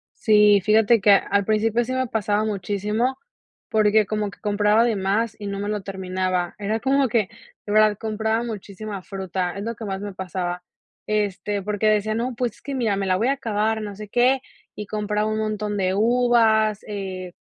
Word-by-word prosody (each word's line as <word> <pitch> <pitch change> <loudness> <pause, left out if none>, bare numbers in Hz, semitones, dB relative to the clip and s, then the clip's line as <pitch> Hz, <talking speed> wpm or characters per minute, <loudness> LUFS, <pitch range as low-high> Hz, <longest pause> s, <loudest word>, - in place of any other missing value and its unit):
Sí, 210 -2 +5
fíjate 220 +2 +4
que 205 - +5
a 200 - +8
al 200 +1 0
principio 220 +3 +1
sí 245 - -5
me 260 0 0
pasaba 215 -1 0
muchísimo, 210 +5 -1 0.5
porque 215 0 +3
como 210 0 -2
que 200 - -15
compraba 210 +1 +2
de 235 -2 +1
más 200 +3 0
y 205 - -6
no 200 0 -4
me 205 - -3
lo 210 -1 -2
terminaba. 185 -2 -2
Era 210 +2 -1
como 270 +2 +2
que, 215 -3 +1 0.4
de 205 - -3
verdad, 215 -1 +4
compraba 220 +1 -1
muchísima 210 -2 -6
fruta, 185 -2 -3
es 200 - -4
lo 230 +2 -4
que 225 - -9
más 195 -1 -4
me 205 -1 -6
pasaba. 180 -1 -4 0.4
Este, 205 -1 -1
porque 210 +2 -1
decía: 215 0 +2
“No, 240 +2 -2
pues, 240 -2 -1
es - - -21
que 280 - -6
mira, 225 -6 +1
me 195 0 -2
la 185 -1 +2
voy 225 +5 +1
a 275 - +3
acabar, 220 -4 -1
no 205 -1 -6
sé 210 +1 -8
qué", 250 +5 +3 0.4
y 210 - -6
compraba 210 0 -1
un 215 0 -1
montón 210 -1 -2
de 185 -1 +1
uvas, 220 -1 +3
eh, 190 -3 -6
210 Hz, 200 wpm, -23 LUFS, 200-220 Hz, 0.5 s, a